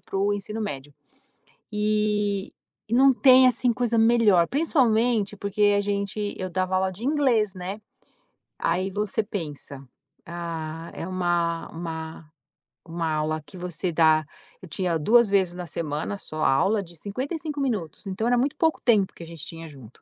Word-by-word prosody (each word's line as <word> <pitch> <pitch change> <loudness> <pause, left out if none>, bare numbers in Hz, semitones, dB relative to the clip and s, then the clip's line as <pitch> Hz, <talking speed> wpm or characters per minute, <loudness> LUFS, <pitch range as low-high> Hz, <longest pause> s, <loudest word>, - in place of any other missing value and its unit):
para - - -7
o 205 +1 +2
ensino 210 +2 -4
médio. 145 -8 -5 0.8
E 210 -1 0 0.4
e - - -2
não 270 +1 +6
tem, 260 0 +7
assim, 245 0 +2
coisa 235 -1 0
melhor, 225 -6 +4
principalmente 235 - +2
porque 205 +1 +2
a - - +2
gente 205 +1 -2
eu 185 0 -4
dava 185 +1 -1
aula 190 0 +1
de 200 +6 -10
inglês, 255 -8 +2
né. 190 +3 -6 0.8
Aí 180 +3 0
você 210 +2 -1
pensa: 150 -8 -6 0.4
"Ah, 165 -1 -6
é - - -5
uma 175 -2 -1
uma 160 -1 -6 0.6
uma 165 -1 -2
aula 155 +1 -1
que 145 - -14
você 180 0 -3
dá". 155 -1 +4 0.4
Eu - - -9
tinha 170 +1 -1
2 230 +6 +4
vezes 190 -3 +2
na 180 -1 -6
semana, 160 +5 -3
só 155 -5 -5
aula 200 +10 +3
de 170 -1 -15
55 285 - -4
minutos, 210 - -3
então, 195 +4 -2
era 245 0 +3
muito 270 +3 0
pouco 320 -1 +1
tempo 210 -6 +3
que 170 - -11
a - - -10
gente 165 -2 -8
tinha 165 0 -8
junto. 130 -6 -14
195 Hz, 160 wpm, -25 LUFS, 165-220 Hz, 0.8 s, tem